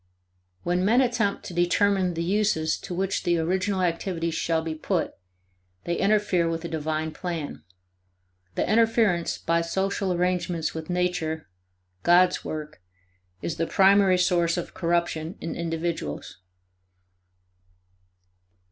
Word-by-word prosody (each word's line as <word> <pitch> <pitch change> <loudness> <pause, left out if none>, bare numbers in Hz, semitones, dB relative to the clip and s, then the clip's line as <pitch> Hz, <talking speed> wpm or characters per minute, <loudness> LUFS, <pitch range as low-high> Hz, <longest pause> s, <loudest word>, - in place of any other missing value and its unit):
When 180 +1 +1
men 225 +6 +4
attempt 235 -6 +1
to - - -7
determine 180 +1 +2
the 165 - -1
uses 180 -4 +1
to 180 - -6
which 190 +1 -1
the 175 -1 +1
original 185 +3 0
activities 170 -1 -1
shall 160 0 0
be 160 -1 -3
put, 160 +2 -1 0.7
they 170 - -1
interfere 195 -4 +2
with 165 0 -3
a - - -1
divine 155 0 -2
plan. 170 -4 -5 0.9
The - - 0
interference 220 -5 +2
by 170 0 +1
social 190 +3 -1
arrangements 175 -2 0
with 160 0 -6
Nature, 175 -3 -1 0.5
God's 180 +1 +4
work, 150 -9 -6 0.6
is 165 - -3
the 165 - 0
primary 195 -1 +5
source 175 -1 +2
of 175 - -4
corruption 170 -1 -1
in 165 - -5
individuals. 165 - -4
175 Hz, 120 wpm, -26 LUFS, 165-190 Hz, 0.9 s, primary